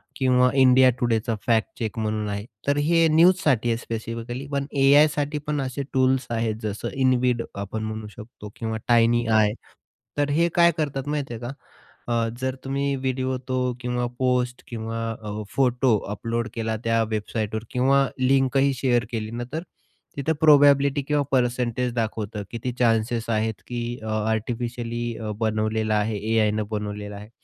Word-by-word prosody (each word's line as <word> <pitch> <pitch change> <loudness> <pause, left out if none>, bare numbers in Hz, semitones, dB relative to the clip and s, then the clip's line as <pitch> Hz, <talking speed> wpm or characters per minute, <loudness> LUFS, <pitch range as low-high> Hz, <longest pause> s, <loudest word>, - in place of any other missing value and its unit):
किंवा 125 -1 +3
India 130 0 +7
टुडेचा 115 -1 0
fact 115 -2 +1
check 110 -1 -3
म्हणून 110 -1 -1
आहे, 100 +1 -4 0.2
तर 140 0 +2
हे 165 +3 +3
न्यूजसाठी 155 -7 +4
आहे 115 - +1
स्पेसिफिकली. 115 +3 -5
पण 140 -1 -1
AIसाठी 145 +2 +4
पण 150 -2 0
असे 135 +1 -3
टूल्स 130 -1 +2
आहेत 115 -2 -1
जसं 105 -1 -3 0.2
InVid, 125 -2 +2
आपण 100 +2 -4
म्हणू 110 0 -5
शकतो 105 -1 -10
किंवा 110 -1 -3
Tiiny 120 0 +4
AI, 110 -1 +4 0.6
तर 145 0 +1
हे 165 +4 +3
काय 170 0 +6
करतात 145 -3 -2
माहिती 145 -4 -2
आहे 115 - -7
का? 120 - -5 0.6
अ, 120 - 0 0.3
जर 130 0 -1
तुम्ही 140 +1 -1
व्हिडिओ 130 0 -1
तो, 130 - -1 0.2
किंवा 125 0 -1
पोस्ट, 125 -1 0
किंवा 115 -1 -4 0.2
अ, 105 0 -5
फोटो 125 -3 +3
अपलोड 115 +2 -2
केला, 110 -1 -2
त्या 115 0 +2
वेबसाईटवर 110 0 -2
किंवा 135 +2 +3
लिंकही 135 +1 +3
शेअर 120 -2 +1
केली 110 -1 -3
ना, 120 +1 -4
तर 160 +2 -3 0.5
तिथं 150 +3 0
प्रोबॅबिलिटी 145 -2 +5
किंवा 145 +1 0
परसेंटेज 125 -1 0
दाखवतं. 110 -2 -3
किती 120 +2 -3
चान्सेस 115 -1 +1
आहेत 110 -1 -1
की 120 -1 -3 0.2
अ, - - -6 0.2
आर्टिफिशियली 120 +1 -3
अ, 110 -1 -4
बनवलेला 110 0 0
आहे 105 0 0 0.2
AIनं 110 0 +2
बनवलेला 105 -1 -4
आहे. 105 +1 -10
120 Hz, 155 wpm, -24 LUFS, 110-135 Hz, 0.6 s, India